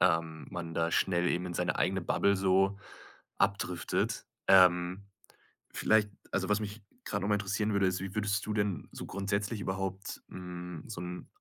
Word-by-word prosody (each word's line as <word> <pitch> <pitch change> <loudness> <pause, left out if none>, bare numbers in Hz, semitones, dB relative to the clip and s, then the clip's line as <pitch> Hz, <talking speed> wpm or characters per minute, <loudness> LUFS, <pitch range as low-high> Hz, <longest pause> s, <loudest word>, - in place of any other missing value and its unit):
ähm, 80 -3 +1
man 85 -2 -5
da 85 0 +1
schnell 90 0 +2
eben 90 +1 0
in 90 - -5
seine 90 +1 0
eigene 95 +1 +1
Bubble 100 +3 +2
so 95 +1 +3 0.6
abdriftet. 100 -3 0 0.2
Ähm, 90 0 +5 0.7
vielleicht 110 -1 +3 0.2
also, 95 +1 0
was 105 +1 +3
mich 105 +1 -5 0.2
grad - - -2
noch 100 - -1
mal 105 - +4
interessieren 105 +1 0
würde, 100 -1 +3
ist, 95 -1 0
wie 95 +1 -5
würdest 105 -1 0
du 105 - -2
denn 100 -7 -1
so - - -7
grundsätzlich 100 +2 -2
überhaupt, 95 0 -3
hm, 90 -2 -7
so 105 -6 -6
'n 90 0 -6
95 Hz, 170 wpm, -31 LUFS, 90-100 Hz, 0.7 s, Ähm